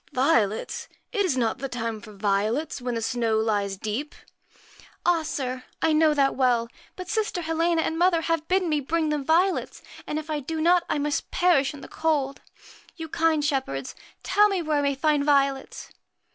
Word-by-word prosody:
1 - - -18
Violets! 220 -8 +1 0.2
It 410 -4 +1
is 295 -8 0
not 235 0 0
the 275 +1 -4
time 230 -3 -4
for 215 - -12
violets, 210 +9 -1
when 245 -1 -2
the 230 - -2
snow 230 -1 0
lies 205 -3 0
deep? 220 +9 -4
' - - -26
70 - - -24
'Ah, 350 -2 +3
sir! 260 -5 -4 0.2
I 320 - +2
know 310 -1 +4
that 275 -1 +3
well; 245 -3 +2 0.3
but 365 -1 -7
sister 415 -2 -1
Helena 325 +1 +1
PRETTY - - 0
and 325 - -3
mother 350 -2 +3
have 330 -1 -1
bidden 370 -1 +2
me 305 -2 +1
bring 315 +3 -1
them 300 -2 -1
violets, 345 +6 +1
MAR - - -16
and 300 - -2
if 310 0 -5
I 300 - -1
do 315 +3 -4
not 350 +2 +4
I - - +1
must 290 0 -2
perish 295 -6 +2
in 280 - -11
the - - -9
cold. 290 -4 -1 0.5
You, 325 -2 -7
USCHKA - - -33
kind 320 -2 +2
shepherds, 265 - -2 0.3
tell 420 0 +4
me 380 -4 -1
where 305 -2 +1
I - - +1
may 280 -1 +1
find 295 0 +2
violets 275 -2 0
295 Hz, 210 wpm, -25 LUFS, 250-325 Hz, 0.5 s, know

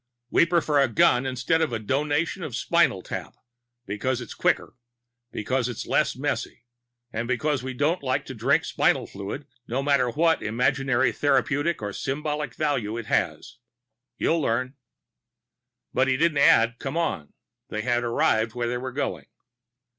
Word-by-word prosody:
We 170 - +5
prefer 160 -4 +2
a 135 - +4
gun 120 +3 +3
instead 130 +6 0
of 160 - +2
the 115 - -2
Donation 145 - -1
of 155 -7 -5
the - - -2
Spinal 150 - +2
Tap, - - -6 0.5
because 120 +6 -2
it's 120 - -7
quicker, - - 0 0.6
because 125 +3 -1
it's 120 - -5
less - - +1
messy - - -3 0.5
and 115 +2 -2
because 130 +3 0
we 130 0 -5
don't 155 +7 +1
like 130 -2 -1
to - - -7
drink - - +2
spinal - - +1
fluid, 100 +9 -7 0.2
no 130 +4 -1
matter 140 -3 +3
what 160 +6 +2
imaginary 130 +2 +1
therapeutic 145 +1 +1
or 100 -1 -3
symbolic 150 +1 -3
value 130 -8 -1
it 115 - -5
has. 120 +2 -1 0.6
You'll 165 0 +1
learn." 130 0 0 1.2
But 130 0 +2
he 130 -1 +2
didn't 160 -1 +2
add 115 -3 +5
"come 140 +4 -4
on." 95 - -2 0.4
They 110 0 -3
had 120 0 +1
arrived 115 -1 +1
where 120 -1 -1
they 120 +1 -2
were 130 +1 -5
going. 140 +4 -3
130 Hz, 160 wpm, -25 LUFS, 120-145 Hz, 1.2 s, We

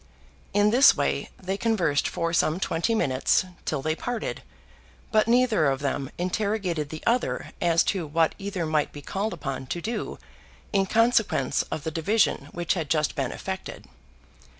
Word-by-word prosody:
In 205 +1 +3
this 260 +4 +7
way - - -1
they 190 +1 -3
conversed 180 -10 +1
for 165 0 -2
some 170 0 +2
twenty 190 +5 0
minutes, 135 -1 +2 0.2
till 140 -3 -2
they 155 - +1
parted; 245 +5 -4 0.7
but 215 0 +3
neither 235 - +3
of 135 0 0
them 140 -1 -2
interrogated 185 -4 -1
the 155 0 -7
other 240 +2 0
as 170 -1 +4
to 180 -5 -3
what 160 +2 +2
either 195 -4 -3
might 155 -1 0
be 145 - -10
called 205 +3 -2
upon 135 -5 -5
to 175 - -3
do 225 +7 -4 0.6
in 195 -1 +2
consequence 225 - +2
of 155 - -4
the 160 - -3
division 165 -1 +1
which 175 -1 -1
had 160 -6 -3
just 155 -2 +1
been 135 -2 -2
effected. 190 0 -6
175 Hz, 160 wpm, -26 LUFS, 155-210 Hz, 0.7 s, this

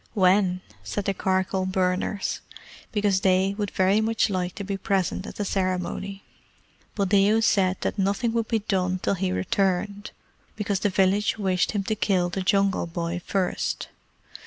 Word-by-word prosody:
"When?" 185 -1 +3 0.2
said 205 - -3
the 195 - +1
charcoal 190 0 0
burners, 185 +2 -1 0.5
because 205 -3 +1
they 190 0 +3
would 205 -1 -1
very 190 +4 +2
much 220 -1 +1
like 180 -1 -2
to 200 - -5
be 200 0 -3
present 195 0 -1
at - - -8
the 205 - -2
ceremony. 190 +1 -2 0.7
Buldeo 200 +2 +3
said 190 -4 +2
that - - -2
nothing 200 +5 +1
would 230 -1 0
be 230 - +1
done 185 -2 0
till - - +2
he 190 -1 -1
returned, 195 +2 -1 0.5
because 205 -2 -1
the 205 - +1
village 195 +3 +2
wished 190 -3 +1
him 205 -2 0
to 215 - -1
kill 190 -4 +1
the 190 +2 -3
Jungle 195 -1 +2
Boy 170 +1 -3
first. 190 -2 -1
195 Hz, 160 wpm, -25 LUFS, 185-205 Hz, 0.7 s, When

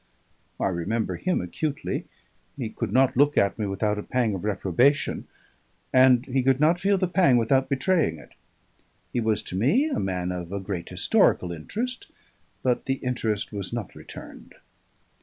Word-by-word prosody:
"I - - 0
remember 95 +6 -2
him 185 0 0
acutely; 140 - -3 0.5
he 115 -5 -4
could - - -4
not 130 0 +3
look 145 +3 +3
at 100 +3 +2
me 105 - -1
without 105 +2 -1
a - - -2
pang 120 -1 0
of 95 - -5
reprobation, 105 - +1 0.7
and 130 -1 +6
he 135 0 0
could 135 +1 +2
not 160 +4 +3
feel 200 +1 +2
the 185 -1 +1
pang 175 -8 +4
without 130 +3 +2
betraying 140 - +1
it. 75 - -15 0.8
He - - +1
was 110 -2 0
to - - -7
me 205 - +2
a - - 0
man 90 -1 -2
of 90 -1 -5
a 100 - -2
great 95 -3 -5
historical 90 - +2
interest, 230 - -4 0.6
but 125 -2 +1
the 135 - +1
interest 115 -6 -2
was 100 -2 -4
not 115 -5 -5
returned." - - -11
120 Hz, 165 wpm, -25 LUFS, 100-140 Hz, 0.8 s, and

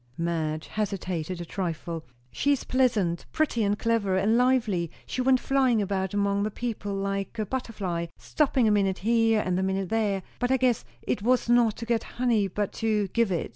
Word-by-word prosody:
Madge 160 -2 -2
hesitated 185 -5 -3
a 175 - -5
trifle. 170 -2 -4 0.3
"She 285 - +2
is 275 - -2
pleasant, 220 -10 +1
pretty, 295 -8 +1
and 205 0 +1
clever, 210 -5 +1
and 205 +4 +2
lively; 235 -9 +2 0.2
she 255 - -3
went 260 0 +4
flying 260 -4 +2
about 195 -1 -1
among 200 0 +1
the 210 - 0
people 215 -3 -4
like 195 +2 -3
a 215 - -1
butterfly, 195 -8 -3
stopping 270 -6 +1
a - - +4
minute 195 -2 +2
here 225 +1 +3
and 180 0 0
a - - +1
minute 190 -1 -1
there, 205 -4 0 0.2
but 245 - 0
I 265 - +4
guess 250 -2 +2 0.2
it - - -1
was 245 +3 +2
not 240 -3 +4
to 230 - -5
get 230 -1 0
honey 235 -5 +2
but 205 +2 -2
to 210 -3 +1
give 230 0 +1
it. 170 - -1
205 Hz, 190 wpm, -27 LUFS, 190-235 Hz, 0.3 s, went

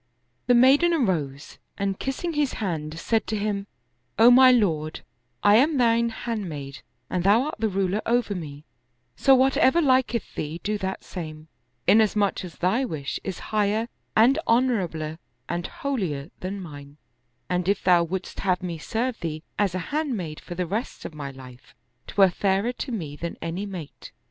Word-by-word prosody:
The 245 - +5
maiden 280 +8 +5
arose 155 - -2 0.2
and 195 -1 -2
kissing 305 +6 -3
his 295 -3 0
hand, 160 -6 -3
said 225 +5 0
to 220 - -1
him, 200 -1 -2 0.3
" 120 0 -46
O 230 +2 +8
my 255 +1 +8
lord, 160 -10 +1 0.4
I 205 +1 +7
am 290 +4 +3
thine 235 -1 +3
hand 220 -4 -4
maid 140 -3 -7 0.3
and 180 -1 -2
thou 205 +6 +5
art 305 +2 -5
the 220 - +1
ruler 195 +1 0
over 235 -2 +1
me; 150 -5 -7 0.5
so 270 - +5
whatever 265 +3 +4
liketh 255 -6 +1
thee 155 +3 -4
do 210 0 -1
that 190 0 -4
same, 155 -3 -8 0.4
inasmuch 210 -2 +3
as 180 -3 -9
thy 195 +9 +1
wish 155 - -4
is 190 -3 -4 0.2
higher 215 +2 +1 0.3
and 250 +7 +5
honorabler 180 -11 +1 0.3
and 175 0 -3
holier 180 - -3
than 195 +2 -4
mine, 145 -5 -10 0.5
and 180 +1 0
if 200 - +1
thou 175 -2 +5
wouldst 185 +2 -5
have 185 -1 0
me 170 -3 -4
serve 235 +8 -2
thee 155 -2 -4 0.2
as 200 -3 +1
a - - -1
hand 295 -6 0
maid 160 -5 -5
for 175 - -8
the 180 0 -1
rest 210 +9 -4
of - - -6
my 145 -2 -6
life, 130 -2 -13 0.3
'twere 195 -2 +4
fairer 195 +5 +1
to 255 - -5
me 160 -11 -4
than 170 +2 -5
any 175 +5 -4
mate." 180 -7 -9
195 Hz, 175 wpm, -25 LUFS, 165-235 Hz, 0.5 s, O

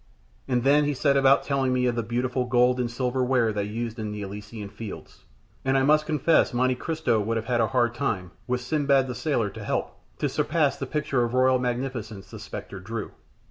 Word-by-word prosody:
And 125 -1 +1
then 145 +2 +4
he 145 -1 0
set 140 +1 +2
about 135 0 +5
telling 135 -2 0
me 125 0 +1
of 125 - +2
the 115 - -1
beautiful 125 +3 -1
gold 125 0 +3
and 120 -1 0
silver 125 +1 -1
ware 125 -3 +2
they 100 -1 -1
used 115 +2 -4
in 105 -1 -3
the 105 0 -5
Elysian 105 +2 -7
Fields, 110 0 -9 0.4
and 135 0 +2
I 135 - +3
must 155 +2 +3
confess 155 -3 +2
Monte 130 +1 +3
Cristo 155 -3 0
would 115 +2 -1
have 110 - -3
had 120 -1 +1
a 110 - +3
hard 120 -2 +1
time, 100 - -2 0.2
with 125 0 -1
Sindbad 140 0 +2
the 125 - -4
Sailor 120 -4 -1
to - - -8
help, - - -3 0.2
to - - 0
surpass 155 -3 +1
the 135 - -5
picture 140 -3 0
of 120 +1 -2
royal 130 0 +4
magnificence 120 -5 -3
the - - -8
spectre 95 - -7
drew. 110 +3 -5
125 Hz, 215 wpm, -26 LUFS, 115-135 Hz, 0.4 s, about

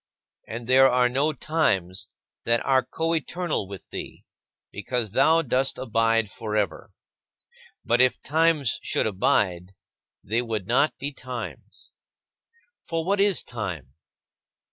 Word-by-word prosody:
And 115 +1 -6
there 130 +2 +6
are 125 0 +3
no 140 +5 +1
times 95 - -1 0.4
that 115 0 +1
are 130 -1 +3
coeternal 165 - -2
with 100 -2 -10
thee, - - -7 0.5
because 110 +2 -3
thou 160 +8 +4
dost 130 0 0
abide 115 -3 +1
forever; 105 -2 -3 1.0
but 120 +2 +3
if 130 -1 +3
times 155 -4 +2
should - - 0
abide, 95 -2 0 0.5
they 115 +4 0
would 110 -5 -3
not 135 +8 +2
be 140 +1 -4
times. 125 -3 -8 0.9
For 165 -1 -3
what 200 +2 +1
is 200 -2 +3
time? 90 - -6
125 Hz, 120 wpm, -25 LUFS, 105-145 Hz, 1.0 s, there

